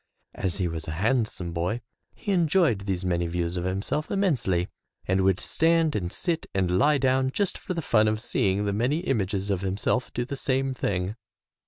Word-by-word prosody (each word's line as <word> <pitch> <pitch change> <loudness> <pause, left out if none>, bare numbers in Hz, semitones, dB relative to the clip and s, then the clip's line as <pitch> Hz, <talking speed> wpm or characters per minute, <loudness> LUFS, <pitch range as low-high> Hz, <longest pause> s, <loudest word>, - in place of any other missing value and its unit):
As 95 -2 -1
he 95 -3 0
was 80 -2 -5
a 75 - -3
handsome 105 -5 0
boy 90 +7 -1 0.4
he 205 - -3
enjoyed 165 - +2
these 95 -1 -1
many 85 -1 +1
views 85 +1 -1
of 90 0 -2
himself 100 +11 -1
immensely, 130 - +1 0.4
and 95 +1 +2
would 95 0 +3
stand 165 -1 +2
and 90 -4 -2
sit 170 -3 -2
and 90 -2 +2
lie 145 +2 +4
down 130 -1 +2
just 200 +7 0
for 185 - -5
the 165 - -2
fun 110 -4 +4
of 110 0 +1
seeing 100 -3 0
the 100 - 0
many 125 +10 +1
images 100 - -1
of 95 -2 0
himself 100 +6 -1
do 120 - -2
the 140 - -4
same 135 0 0
thing. 100 -3 -2
105 Hz, 190 wpm, -26 LUFS, 95-135 Hz, 0.4 s, lie